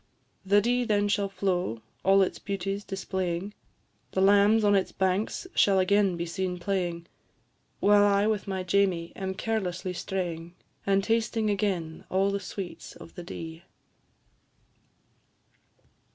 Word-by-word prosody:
The 200 +2 +4
Dee 245 +3 +1
then 205 -3 +1
shall 200 -1 +1
flow, 180 - -1 0.2
all 195 +1 +5
its 185 - -3
beauties 195 +1 -3
displaying, 190 -1 -3 0.6
The 190 - +1
lambs 205 +3 +5
on 205 -1 +4
its 195 -2 +2
banks 190 - -1
shall 195 -1 +4
again 195 -1 +3
be 170 - -2
seen 180 +1 -3
playing, 175 -2 -2 0.7
While 205 0 +5
I 200 0 +3
with 215 -2 0
my 190 -1 -2
Jamie 180 -3 +1
am 190 0 -4
carelessly 190 -4 -2
straying, 175 -2 -4 0.3
And 195 0 +3
tasting 225 -1 +1
again 185 -6 -2
all 195 +1 +2
the 200 - -1
sweets 190 -1 -7
of - - -13
the - - -8
Dee. 165 -1 -8
195 Hz, 135 wpm, -28 LUFS, 180-205 Hz, 0.7 s, all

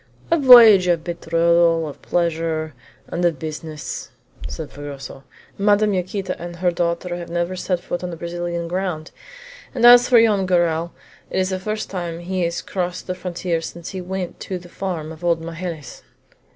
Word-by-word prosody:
"A 335 - +4
voyage 230 -8 +9
of 170 -2 +1
betrothal, 170 -1 +2
of 145 - -10
pleasure, 165 -2 -1 0.4
and 175 - -3
of 170 -4 +2
business!" 155 0 -6 0.4
said 160 -3 -7
Fragoso. 140 -2 -9 0.3
"Madame 205 +1 +3
Yaquita 185 +1 -2
and 175 0 -6
her 175 +1 +1
daughter 175 +1 -2
have 175 -1 -7
never 175 +2 -2
set 180 -1 -1
foot 175 0 -5
on 175 -1 -4
Brazilian 170 0 -4
ground; 180 -3 -3 0.6
and 240 -2 +2
as 245 0 +8
for 245 -2 +7
Joam 210 -4 +3
Garral, 170 -2 +1 0.4
it - - -3
is 185 0 +1
the 185 - -2
first 215 +3 -4
time 175 -3 -4
he 185 +2 -3
has 170 0 -3
crossed 180 -1 -3
the 185 - -3
frontier 180 -2 -3
since 170 0 -7
he 190 -2 -5
went 185 0 -5
to 185 - -4
the 175 0 -13
farm 170 -5 -4
of 160 +1 -12
old 170 -1 +2
Magalhaës." 165 -2 -7
175 Hz, 170 wpm, -21 LUFS, 165-185 Hz, 0.6 s, voyage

